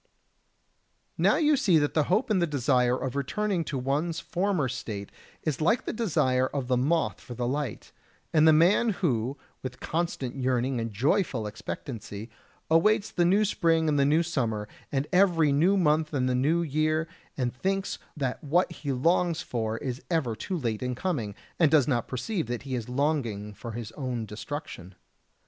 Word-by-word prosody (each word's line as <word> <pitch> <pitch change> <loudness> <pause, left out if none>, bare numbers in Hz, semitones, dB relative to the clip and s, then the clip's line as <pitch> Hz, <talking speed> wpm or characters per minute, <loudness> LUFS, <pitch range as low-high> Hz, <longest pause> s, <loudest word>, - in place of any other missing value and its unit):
Now - - +3
you 305 -1 +4
see 205 - +4
that 145 -1 +1
the 155 -2 +2
hope 210 +4 +1
and 190 -4 +3
the 170 - +2
desire 125 -3 +2
of 130 0 -4
returning 190 +8 -1
home - - 0
to 140 - -3
one's 150 +6 -1
former 180 -5 0
state 110 -5 -5 0.3
is 155 -3 -2
like 220 +11 +2
the - - -2
desire 130 - +1
of 135 -3 -4
the 125 - +2
moth 150 +7 +1
for 120 - -9
the 120 +1 -2
light, 135 -2 -3 0.4
and 155 0 +5
the - - +8
man 175 +9 +4 0.2
who, 125 -1 0 0.2
with 130 0 -6
constant 160 -6 -2
yearning 130 -1 0
and 115 0 -3
joyful 135 - +1
expectancy, 110 0 -6 0.4
awaits 200 +6 +3
the 175 - +2
new 200 +5 +4
spring 165 -5 +2
and 145 -2 +2
the - - +5
new 155 +4 +3
summer, 115 -10 -2 0.2
and 135 0 0
every 175 -5 +4
new 170 +8 +3
month 155 -3 +2
and 130 -2 +1
the 130 - +1
new 150 +7 +2
year, 155 +1 0 0.3
and 125 -3 -1
thinks 195 +7 -2 0.2
that 130 -4 -2
what 170 +5 +2
he 145 -4 -4
longs 165 +5 +1
for 110 -2 -2
is 125 0 -4
ever 150 -10 0
too 185 - -3
late 115 -8 -2
in 125 0 -2
coming, 120 - -2 0.2
and 165 -4 +5
does 150 -4 +4
not 120 -5 0
perceive 150 - -2
that 120 0 -4
he 135 -2 -5
is 120 -2 -3
longing 125 -7 -1
for 115 +2 -8
his 115 -1 -6
own 125 -3 -3
destruction. 105 - -7
140 Hz, 180 wpm, -27 LUFS, 125-170 Hz, 0.4 s, the